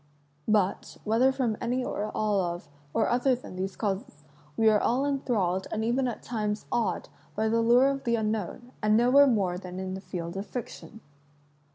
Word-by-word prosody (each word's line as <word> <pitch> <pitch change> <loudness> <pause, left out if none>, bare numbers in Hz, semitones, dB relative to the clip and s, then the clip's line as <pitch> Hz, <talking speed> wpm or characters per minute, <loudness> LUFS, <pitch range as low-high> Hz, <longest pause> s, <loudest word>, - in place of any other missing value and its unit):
But, 205 -3 +1
whether 230 +5 +3
from 250 -5 -1
any 250 +2 -1
or 210 +1 -3
all 210 -2 +1
of, 175 -1 -4 0.2
or 225 - +1
other 250 +2 +2
than, 245 -6 -10
these 190 +1 -3
causes, 195 -8 -3 0.3
we 225 - +4
are 215 -1 +5
all 255 +6 +1
enthralled 210 -10 0
and 220 0 -1
even 255 +3 +1
at 240 - -5
times 210 -3 -2
awed 230 -3 0 0.3
by 220 +1 +1
the 230 +1 +2
lure 240 +3 +5
of 275 0 -3
the 235 -2 +1
unknown, 220 +2 -3
and 215 0 +4
nowhere 260 +4 +6
more 190 -7 +1
than 180 -1 -7
in 190 0 -4
the 190 - -6
field 180 -2 -6
of 195 - -4
fiction. 225 -2 -7
220 Hz, 185 wpm, -28 LUFS, 195-245 Hz, 0.3 s, nowhere